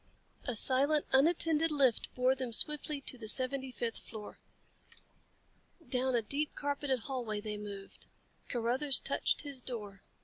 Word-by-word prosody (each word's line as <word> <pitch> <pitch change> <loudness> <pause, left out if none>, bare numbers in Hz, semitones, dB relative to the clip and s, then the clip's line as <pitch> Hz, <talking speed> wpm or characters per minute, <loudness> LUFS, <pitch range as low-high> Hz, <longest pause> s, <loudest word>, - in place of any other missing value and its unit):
A 250 - -3
silent, 280 +6 +3
unattended 325 +2 +3
lift 275 -6 +1
bore 255 +1 +2
them 255 -3 -5
swiftly 300 +3 +3
to 255 -2 -3
the 220 - -8
seventy 260 +3 +1
fifth 235 -2 -4
floor. 215 -2 -11 1.5
Down 255 -1 0
a 235 - +1
deep 285 +7 -2
carpeted 285 -3 -2
hallway 235 -4 -4
they 210 0 -5
moved. 200 -1 -10 0.4
Carruthers 255 +4 +4
touched - - +1
his 280 -3 -6
door. 210 -6 -7
255 Hz, 135 wpm, -32 LUFS, 230-285 Hz, 1.5 s, Carruthers